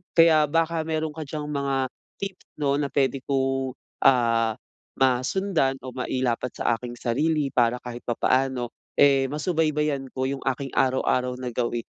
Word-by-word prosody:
Kaya 160 -2 +6
baka 165 +1 +1
meron 160 -1 -1
ka 155 +1 -6
diyang 150 0 -4
mga 140 -2 0 0.3
tips 195 -1 -6
'no, 140 -2 +1
na 145 - 0
pwede 135 0 +1
kong, 135 -1 0 0.3
ah, 115 -3 +3 0.4
masundan 135 +4 +1
o 130 - -6
mailapat 125 -1 -2
sa 120 - +1
aking 120 -1 -7
sarili 145 +5 0
para 120 -1 +2
kahit 120 -1 -6
papaano, 130 +1 +1 0.3
eh, 135 -1 +5
masubaybayan 150 -2 0
ko 130 0 -1
yung 135 0 -4
aking 135 +1 -1
araw-araw 130 -1 +2
na 125 - -3
gawi 120 0 -1
135 Hz, 145 wpm, -25 LUFS, 125-150 Hz, 0.4 s, Kaya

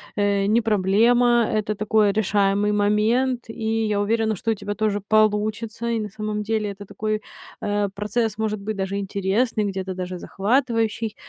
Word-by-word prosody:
э, 200 -1 +1
не 225 +3 +3
проблема, 230 +4 +3
это 215 0 -1
такой 215 0 +2
решаемый 205 0 +1
момент, 220 +5 +1
и 225 0 -1
я 205 -1 0
уверена, 220 +1 +1
что 225 +5 -1
у - - +3
тебя 205 0 -5
тоже 210 -1 0
получится, 215 +2 +1
и 230 -1 0
на 210 -1 -4
самом 210 +1 -4
деле 215 -1 -1
это 200 +1 -10
такой, 215 +2 -3 0.4
э, 205 -1 0
процесс, 215 +1 -1
может 215 -1 -1
быть, 215 +1 -4
даже 195 +1 -2
интересный, 200 +3 0
где-то 190 -1 -3
даже 180 -1 -5
захватывающий. 225 0 0
210 Hz, 160 wpm, -23 LUFS, 205-225 Hz, 0.4 s, не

